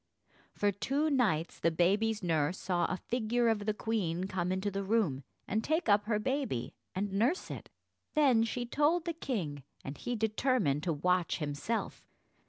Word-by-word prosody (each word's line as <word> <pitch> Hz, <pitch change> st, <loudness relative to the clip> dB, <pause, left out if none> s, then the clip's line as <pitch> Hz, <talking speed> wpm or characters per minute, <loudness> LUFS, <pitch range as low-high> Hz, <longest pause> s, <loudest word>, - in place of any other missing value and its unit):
For 205 Hz, 0 st, +2 dB
two 280 Hz, +10 st, 0 dB
nights 195 Hz, -, +1 dB
the 165 Hz, -, +3 dB
baby's 200 Hz, +6 st, +2 dB
nurse 165 Hz, 0 st, +1 dB
saw 175 Hz, -2 st, 0 dB
a 185 Hz, -, -1 dB
figure 235 Hz, +2 st, 0 dB
of 210 Hz, -2 st, 0 dB
the 215 Hz, -, +2 dB
queen 190 Hz, -7 st, -1 dB
come 185 Hz, -2 st, -1 dB
into 190 Hz, +2 st, -1 dB
the 195 Hz, 0 st, -2 dB
room 190 Hz, -10 st, +1 dB, 0.2 s
and 215 Hz, +2 st, 0 dB
take 315 Hz, -1 st, 0 dB
up 205 Hz, 0 st, +4 dB
her 215 Hz, -1 st, +1 dB
baby 260 Hz, -, -2 dB, 0.2 s
and 195 Hz, +1 st, -2 dB
nurse 240 Hz, -, +1 dB
it. -, -, -7 dB, 0.5 s
Then 265 Hz, -7 st, +5 dB
she 240 Hz, +2 st, -2 dB
told 300 Hz, +7 st, +2 dB
the 340 Hz, -, -1 dB
king, 180 Hz, -, -3 dB, 0.2 s
and 135 Hz, -, -5 dB
he 245 Hz, -, -2 dB
determined 220 Hz, -, +1 dB
to 170 Hz, -, +1 dB
watch 180 Hz, +3 st, +1 dB
himself. 150 Hz, +9 st, -3 dB
205 Hz, 170 wpm, -32 LUFS, 175-240 Hz, 0.5 s, Then